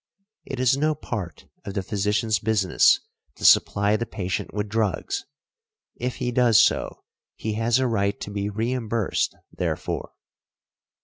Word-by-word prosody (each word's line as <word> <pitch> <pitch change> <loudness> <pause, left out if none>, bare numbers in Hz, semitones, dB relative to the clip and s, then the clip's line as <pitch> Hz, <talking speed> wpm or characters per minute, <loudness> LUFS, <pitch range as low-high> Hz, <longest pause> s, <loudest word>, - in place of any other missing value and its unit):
It 130 - -5
is 130 0 +4
no 155 +2 +1
part 105 - -6 0.2
of 100 - -7
the 95 - -1
physicians 105 +1 0
business 105 -4 +3 0.3
to - - -6
supply 100 +1 +5
the 115 +1 -2
patient 95 -3 -3
with 105 0 -2
drugs; 105 -3 -1 0.7
if 125 +1 -3
he 125 - -2
does 120 -3 +5
so - - +2 0.3
he 110 - -3
has 115 +2 +2
a 130 - +1
right 100 -4 0
to 105 - -5
be 100 0 -2
reimbursed 115 0 -1 0.2
therefor. - - -3
110 Hz, 140 wpm, -24 LUFS, 100-120 Hz, 0.7 s, supply